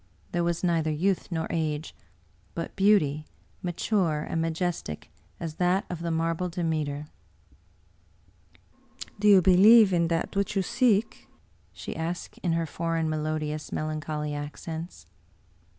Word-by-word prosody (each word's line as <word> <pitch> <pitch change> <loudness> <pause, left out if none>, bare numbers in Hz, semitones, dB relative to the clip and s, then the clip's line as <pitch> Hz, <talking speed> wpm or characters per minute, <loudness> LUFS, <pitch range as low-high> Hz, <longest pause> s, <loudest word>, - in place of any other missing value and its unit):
There 175 -1 0
was 170 +1 -1
neither 165 -3 +1
youth 180 +6 0
nor 160 -1 -1
age, 155 -1 -2 0.6
but 165 - -5
beauty, 155 -7 +3 0.3
mature 175 -3 0
and 165 - -1
majestic 165 - -3 0.3
as 160 -2 -5
that 180 +2 +2
of 170 -1 -5
a 170 - -1
marble 165 +2 -1
Demeter. 155 -4 -2 1.1
" - - -18
Do 210 - +2
you 195 -3 +7
believe 200 +3 +7
in 170 -1 +3
that 165 +4 -2
which 200 +1 0
you 195 - +2
seek? 235 -1 +1 0.2
" - - -34
she - - -7
asked 165 +2 -4
in 170 -3 0
her 165 0 0
foreign, 165 0 -1
melodious, 155 0 -3
melancholy 155 -1 -3
accents. 160 +3 -6
165 Hz, 135 wpm, -27 LUFS, 155-180 Hz, 1.1 s, you